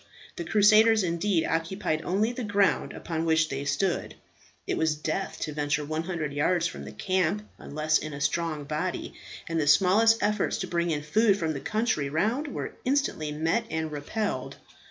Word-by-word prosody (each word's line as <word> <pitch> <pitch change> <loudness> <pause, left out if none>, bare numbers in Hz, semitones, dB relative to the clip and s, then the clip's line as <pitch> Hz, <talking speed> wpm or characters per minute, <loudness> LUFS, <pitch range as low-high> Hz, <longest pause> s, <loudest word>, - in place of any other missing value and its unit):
The 355 - -4
crusaders, 215 -2 +5
indeed, 170 0 +1
occupied 165 -1 -1
only 205 +7 0
the 245 0 -5
ground 200 -8 +1
upon 165 -1 -4
which 160 -1 +2
they 140 +1 -4
stood. 185 +5 -1 0.5
It - - -1
was 160 -1 +1
death 155 +5 -3
to 155 - -3
venture 145 0 -1
100 155 -1 -3
yards 165 +4 +1
from - - -4
the - - -8
camp, 190 +2 -1
unless 155 +1 0
in 155 - -6
a 140 - -6
strong 155 +1 -1
body; 155 +5 -3 0.3
and 165 -1 0
the 145 - -1
smallest 200 +8 +5
efforts 210 0 +1
to - - -4
bring 170 0 0
in 150 -2 -1
food 200 +7 +3
from 160 -4 -1
the 140 - -4
country 215 - -1
round 220 - 0
were 280 - -5
instantly 255 - 0
met 165 +10 0
and 160 -1 -2
repelled. 175 +9 -3
165 Hz, 175 wpm, -27 LUFS, 155-205 Hz, 0.5 s, crusaders